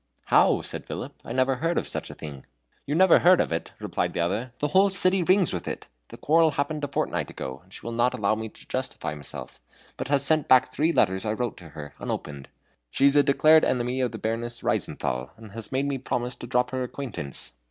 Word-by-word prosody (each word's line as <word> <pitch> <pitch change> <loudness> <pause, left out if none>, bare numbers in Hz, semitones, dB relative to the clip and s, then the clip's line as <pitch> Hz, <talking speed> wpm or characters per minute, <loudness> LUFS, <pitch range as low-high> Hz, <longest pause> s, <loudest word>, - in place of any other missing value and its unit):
"How?" - - +4
said - - -6
Philip, - - -5
"I - - -8
never 130 +1 +2
heard 165 +5 0
of - - -1
such - - -4
a - - -9
thing." 70 -4 -9 0.4
"You 145 - 0
never 185 0 +6
heard 180 +1 +6
of - - +1
it?" 80 - -3
repeated - - -2
the - - -3
other; 105 +9 -1
"the 150 - -1
whole 195 +5 +5
city 185 0 +2
rings 185 - +3
with 90 - -4
it. - - -5 0.2
The - - -11
quarrel 160 +1 +4
happened 145 +2 -2
a - - 0
fortnight 140 - -2
ago, 65 +1 -6
and 95 - -26
she - - -10
will 115 - -3
not 120 +2 +2
allow 105 0 +1
me 110 0 -4
to - - -17
justify 130 -11 -3
myself, 75 -2 -8 0.4
but - - -4
has 140 0 +3
sent 155 +1 +3
back 130 0 +5
three 160 +3 +2
letters 95 - +2
I 105 - -1
wrote 120 0 -2
to 85 -3 -12
her, 75 -1 -9
unopened. 70 -2 -5 0.4
She 135 - +1
is 140 +1 +5
a 145 - +7
declared 155 +3 +5
enemy 125 +1 0
of 125 -3 0
the - - -6
Baroness 115 +1 -3
Reizenthal, 65 0 -1
and 110 -2 -12
had 115 +1 -6
made 135 +1 0
me 140 -1 -2
promise 125 -1 -2
to 120 - -8
drop 125 0 +1
her 130 0 -2
acquaintance. 120 - -6
125 Hz, 230 wpm, -26 LUFS, 105-145 Hz, 0.4 s, a